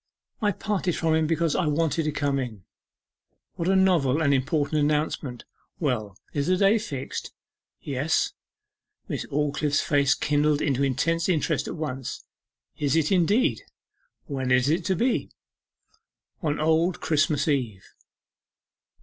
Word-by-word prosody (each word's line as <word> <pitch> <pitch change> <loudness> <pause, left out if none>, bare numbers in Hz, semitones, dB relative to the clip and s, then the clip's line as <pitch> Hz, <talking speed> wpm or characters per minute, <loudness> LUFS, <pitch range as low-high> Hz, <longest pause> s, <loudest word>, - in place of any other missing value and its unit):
'I 210 -1 +2
parted 190 -3 -1
from 165 -1 +1
him 160 0 +2
because 165 -1 +1
I 175 - +1
wanted 160 +1 +1
to 155 - 0
come 145 -1 0
in.' 115 -7 -5 0.9
'What 170 - -3
a 190 - +3
novel 170 -8 +3
and 145 -3 +3
important 145 +3 0
announcement! 150 -4 -1 0.3
Well, 110 - -2 0.2
is 145 -1 -1
the 185 0 +3
day 200 +4 +4
fixed?' 135 -10 -5 0.5
'Yes.' 145 +3 0 0.7
Miss - - -3
Aldclyffe's 150 0 0
face 145 -1 +2
kindled 150 0 +1
into 140 -3 0
intense 165 +6 +1
interest 165 -5 0
at - - -4
once. 135 -5 -5 0.5
'Is 145 0 +1
it 160 0 +2
indeed? 200 - +2 0.6
When 135 -3 -3
is 125 +2 +3
it 165 +3 +1
to 190 - +1
be?' 245 +7 0 1.1
'On 150 -4 -1
Old 160 +3 +2
Christmas 155 -1 +1
Eve. 120 -10 -1
150 Hz, 135 wpm, -25 LUFS, 140-165 Hz, 1.1 s, day